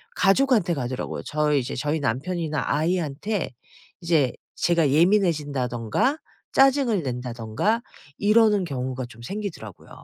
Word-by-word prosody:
가족한테 205 -4 +3
가더라고요. 130 -2 -4
저희 150 -1 +1
이제 125 0 -4
저희 150 +4 -1
남편이나 155 +4 -2
아이한테 165 +4 -1 0.5
이제 160 -7 +2 0.2
제가 170 -5 +2
예민해진다든가 150 - +1 0.3
짜증을 270 -7 +3
낸다든가 125 - -2 0.4
이러는 210 -1 +4
경우가 130 -4 -4
좀 115 -1 -14
생기더라고요. 190 - -7
155 Hz, 325 characters per minute, -24 LUFS, 130-200 Hz, 0.5 s, 이러는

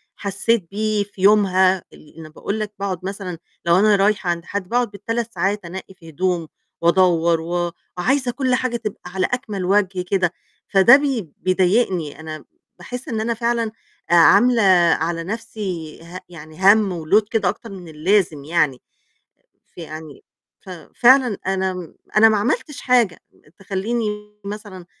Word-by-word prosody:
حسّيت 200 -1 -1
بيه 215 0 0
في 200 -2 -14
يومها. 190 -2 +4
اللي 155 - -18
أنا 160 -1 -10
باقول 200 +7 -4
لك 215 -1 -4
باقعد 185 -3 -4
مثلًا 195 -3 -5 0.3
لو 170 +1 +4
أنا 210 +1 +5
رايحة 200 -2 +1
عند 170 0 -2
حد 200 -1 -5
باقعُد 240 -2 0
بال3 230 +3 -4
ساعات 200 0 -1
أنقّي 190 +2 -8
في 170 -4 -15
هدوم، 175 +1 -1 0.3
وأدوّر، 170 -1 +3
و 175 +1 -2 0.3
عايزة 255 +7 +1
كل 255 0 0
حاجة 245 -1 -1
تبقى 215 -3 -6
على 190 -1 0
أكمَل 215 -7 -3
وَجه 190 -1 +1
كده، 180 -1 0 0.3
فده 195 +6 +7
بي 265 - -1
بيضايقني، 185 -4 0
أنا 155 -1 -8 0.3
باحس 250 +1 -8
إن 220 -3 -2
أنا 235 +2 -1
فعلًا 235 -1 -1 0.4
آآ - - +6
عاملة 235 +8 +6 0.4
على 165 +1 -2
نفسي 195 -6 -6
ه 175 +2 -9
يعني 155 -1 -12
هَم 190 -7 -1
وload 210 +7 +4
كده 210 -5 +1
أكتر 225 - -7
من 185 -3 -10
اللازم 160 -1 0
يعني، 150 -4 0 0.9
فيعني 155 -3 -10 0.4
ف 190 - -13 0.3
فعلًا 250 -3 +5
أنا 190 -3 -2 0.2
أنا 220 +1 +8
ما 220 - +2
عملتش 290 - -2
حاجة 240 -9 +2 0.4
تخلّيني 210 +4 -2 0.3
مثلًا 200 -3 -8
195 Hz, 150 wpm, -20 LUFS, 175-220 Hz, 0.9 s, أنا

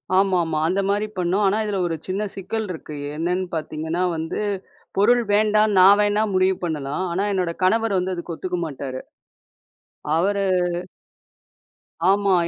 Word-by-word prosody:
ஆமாமா. 180 -5 +2
அந்த 190 +3 +1
மாரி 205 +1 +1
பண்ணோம். 180 +3 +1
ஆனா, 200 - +2
இதுல 205 -2 -1
ஒரு 165 - -2
சின்ன 195 +3 -1
சிக்கல் 210 +3 -3
இருக்கு. 155 -3 -8 0.2
என்னன்னு 180 +4 -1
பாத்தீங்கன்னா, 160 +2 -3
வந்து 160 +5 -3 0.6
பொருள் 240 +4 +4
வேண்டா 215 0 +4 0.2
நான் 195 +2 +8
வேணா 205 0 +2
முடிவு 185 0 +3
பண்ணலாம். 150 0 -2
ஆனா 190 +4 0
என்னோட 185 -3 0
கணவர் 225 +2 +2
வந்து 185 +1 -1
அதுக்கு 170 -1 -5
ஒத்துக்க 180 +1 -3
மாட்டாரு. 135 -3 -5 1.2
அவரு 200 +4 +1 1.7
ஆமா. 200 0 +3
185 Hz, 135 wpm, -22 LUFS, 170-205 Hz, 1.7 s, நான்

